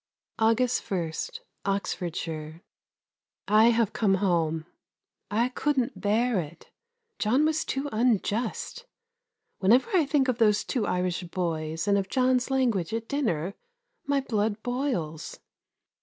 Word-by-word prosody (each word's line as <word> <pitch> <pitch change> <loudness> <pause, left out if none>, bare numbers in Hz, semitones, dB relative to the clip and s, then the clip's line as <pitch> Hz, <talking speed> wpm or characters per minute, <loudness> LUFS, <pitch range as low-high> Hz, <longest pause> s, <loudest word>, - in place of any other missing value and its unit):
August 230 +2 +2
1, 175 -5 -1 0.5
Oxfordshire. 165 -5 -3 0.8
I 215 +2 +6
have 230 -2 +3
come 200 -4 +2
home. 165 -5 0 0.6
I 230 +4 +1
couldn't 255 -6 -1
bear 220 +2 +2
it. 165 0 -8 0.5
John 255 +8 +3
was 315 0 +1
too 270 +2 -2
unjust. 230 - -1 0.7
Whenever 240 - +4
I 325 -6 +4
think 275 -1 +2
of 250 -2 0
those 210 -2 +4
two 240 -6 -1
Irish 180 0 0
boys 165 -1 -3
and 200 0 +4
of 190 -1 -4
John's 255 -1 +2
language 230 -9 +1
at 225 0 -4
dinner, 200 - -1 0.5
my 280 -1 +2
blood 215 -3 -1
boils. 245 - -3
215 Hz, 120 wpm, -27 LUFS, 180-250 Hz, 0.8 s, I